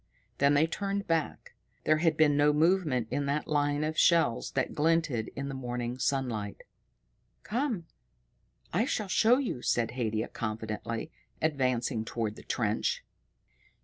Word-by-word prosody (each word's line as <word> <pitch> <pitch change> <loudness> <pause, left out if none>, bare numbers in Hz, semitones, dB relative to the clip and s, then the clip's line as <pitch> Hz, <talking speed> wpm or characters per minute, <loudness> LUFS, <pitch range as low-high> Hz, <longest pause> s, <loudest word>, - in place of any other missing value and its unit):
Then 140 +1 +4
they 150 +3 +5
turned 200 +4 -2
back. 165 -3 -2 0.3
There 155 - +3
had 165 -1 +2
been 150 -2 +5
no 145 +1 +4
movement 155 -7 +2
in 140 -1 -1
that 145 +2 -1
line 145 0 +1
of 155 +1 -1
shells 165 -9 +3
that 135 - -1
glinted 155 -7 +1
in 140 0 -4
the 135 - -4
morning 125 -1 -4
sunlight. 120 -6 -2 0.8
"Come, 230 - -1 0.9
I 210 +8 +2
shall 215 -6 -2
show 230 +5 +4
you," 250 - -2
said 115 -2 +1
Haidia 110 -2 -2
confidently, 110 +3 -4 0.3
advancing 130 -6 0
toward 110 -1 -3
the - - -11
trench. - - -1
145 Hz, 140 wpm, -30 LUFS, 120-165 Hz, 0.9 s, they